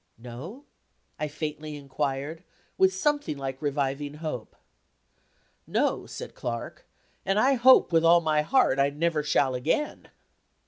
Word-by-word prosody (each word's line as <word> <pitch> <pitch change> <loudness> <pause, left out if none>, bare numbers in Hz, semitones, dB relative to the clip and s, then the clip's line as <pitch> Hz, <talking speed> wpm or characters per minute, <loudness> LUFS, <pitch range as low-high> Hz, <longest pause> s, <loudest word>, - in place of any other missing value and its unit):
"No?" 135 - -9 0.5
I 150 - -1
faintly 150 0 -5
inquired, 145 +3 -4 0.3
with 190 0 +4
something 290 - -1
like 135 -1 -5
reviving 145 0 -2
hope. 150 -7 -6 1.1
"No," - - 0
said - - -8
Clark, 115 -1 -6 0.4
"and 195 +1 0
I 265 +5 +4
hope, 260 -3 +6
with 165 0 +4
all 170 +1 +6
my 155 -2 +1
heart, 160 - +2
I 140 0 +4
never 155 +2 0
shall 145 -3 +1
again." 125 - -2
150 Hz, 130 wpm, -27 LUFS, 140-170 Hz, 1.1 s, hope